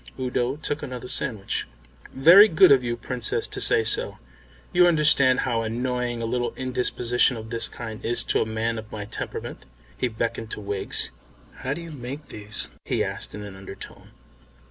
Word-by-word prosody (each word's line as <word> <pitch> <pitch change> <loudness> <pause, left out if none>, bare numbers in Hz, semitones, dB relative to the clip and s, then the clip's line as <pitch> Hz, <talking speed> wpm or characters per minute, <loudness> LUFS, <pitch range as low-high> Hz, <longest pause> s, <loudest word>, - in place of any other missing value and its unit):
Udo 125 0 -1
took 150 -1 -4
another 125 -3 -6
sandwich. 110 -6 -3 0.4
"Very 170 +10 +8
good 160 -7 +6
of 135 -2 +6
you, 120 -1 -2
Princess, 120 0 -1
to - - -3
say - - +5
so. - - 0 0.6
You 180 0 +6
understand 150 -6 +4
how 115 -3 0
annoying 120 +1 -2
a - - -1
little 120 +1 -2
indisposition 125 -1 +1
of 110 +1 -9
this 115 -1 +1
kind 110 -2 -8
is 120 +1 +2
to - - +1
a - - +1
man 110 +1 -2
of 110 0 -11
my 105 -1 -5
temperament." 105 - -6 0.3
He 125 - -1
beckoned 115 -1 -3
to - - -6
Wiggs. 100 -1 -2 0.5
"How 135 +2 -3
do 170 - -7
you 170 -1 -9
make 140 +2 -8
these?" 105 0 -5 0.2
he - - 0
asked - - -1
in 105 - -7
an 100 -2 -9
undertone. 95 0 -11
120 Hz, 175 wpm, -25 LUFS, 110-130 Hz, 0.6 s, Very